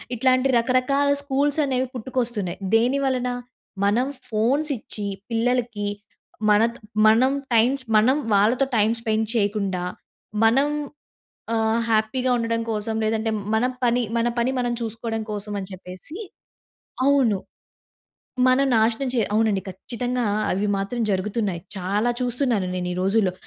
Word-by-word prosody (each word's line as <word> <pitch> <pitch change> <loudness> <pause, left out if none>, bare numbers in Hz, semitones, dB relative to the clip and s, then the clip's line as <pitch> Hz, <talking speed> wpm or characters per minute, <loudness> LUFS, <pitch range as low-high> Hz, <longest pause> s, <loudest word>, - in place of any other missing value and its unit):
ఇట్లాంటి 255 +2 +3
రకరకాల 255 +4 +2 0.2
స్కూల్స్ 285 +2 +1
అనేవి 260 -1 0
పుట్టుకొస్తున్నాయి. 240 -6 -2 0.2
దేనివలన, 255 +1 +1 0.6
మనం 230 +6 +2 0.2
ఫోన్స్ 250 +8 +1
ఇచ్చి 210 -1 -5 0.2
పిల్లలకి 230 -2 0 0.6
మన 210 0 +5 0.4
మనం 230 +5 +5 0.2
టైమ్ 230 +3 +4
స్ - - -14
మనం 240 +6 +5 0.2
వాళ్ళతో 220 +7 +3
టైమ్ 215 +1 +3
స్పెండ్ 220 -1 0
చేయకుండా 200 -4 0 0.6
మనం 255 +6 +4 0.9
ఆహ్, 225 +1 +1
హ్యాపీగా 225 +4 +1
ఉండడం 230 -1 -1
కోసం 220 0 -2
లేదంటే 220 +1 0 0.2
మన 220 +2 +2 0.2
పని, 245 +1 +2
మన 235 +1 +2
పని 235 +2 +2
మనం 245 -1 0
చూసుకోవడం 225 0 -3
కోసం 210 0 -5
అని 190 -1 -5
చెప్పేసి 185 - -9 0.9
అవును. 270 -7 +4 1.1
మనం 255 +2 +4
నాశనం 225 +4 +2
చే 240 - +2
అవునండి 215 -3 +2
ఖచ్చితంగా 245 +5 -3 0.3
అవి 200 +3 0
మాత్రం 200 +5 -3
జరుగుతున్నాయి. 195 -2 -1
చాలా 200 +5 0
చూస్తున్నాను 245 -5 0
నేనీ 180 0 -2
రోజుల్లో. 195 0 +2
230 Hz, 120 wpm, -23 LUFS, 210-255 Hz, 1.1 s, మన